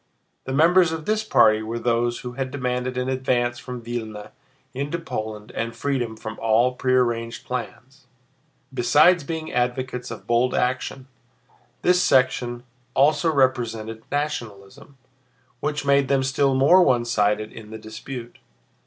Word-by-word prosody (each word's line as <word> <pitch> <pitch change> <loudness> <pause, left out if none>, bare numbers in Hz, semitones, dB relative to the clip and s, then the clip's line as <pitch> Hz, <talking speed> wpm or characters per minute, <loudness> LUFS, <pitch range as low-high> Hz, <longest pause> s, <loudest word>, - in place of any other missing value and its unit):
The 130 - -4
members 165 +4 +4
of 160 -1 -5
this 215 0 0
party 110 - +4
were 110 +2 -4
those 120 0 0
who 125 - -6
had 130 +1 -4
demanded 125 -1 -2
an 125 0 -1
advance 125 -2 0
from 125 -2 -8
Vílna 110 -3 -6 0.4
into 140 +5 -3
Poland 110 -10 -6
and 115 0 -4
freedom 120 -3 -2
from 110 0 -7
all 115 +3 +3
prearranged 120 -3 0
plans. 125 +1 -7 0.7
Besides 150 +7 +4
being 160 +2 -5
advocates 125 0 -2
of 110 -4 -8
bold 120 +2 +2
action, 130 +1 -1 0.8
this 180 0 +4
section 125 -3 +2 0.3
also 150 +4 +3
represented 115 -5 0
nationalism, 130 -4 -5 0.6
which 150 -1 -2
made 140 -1 +3
them 135 -1 +2
still 135 0 +1
more 145 +8 +6
one 125 -8 +3
sided 105 -2 0
in 105 -1 -11
the 110 - -7
dispute. 115 +3 -9
125 Hz, 135 wpm, -23 LUFS, 115-140 Hz, 0.8 s, more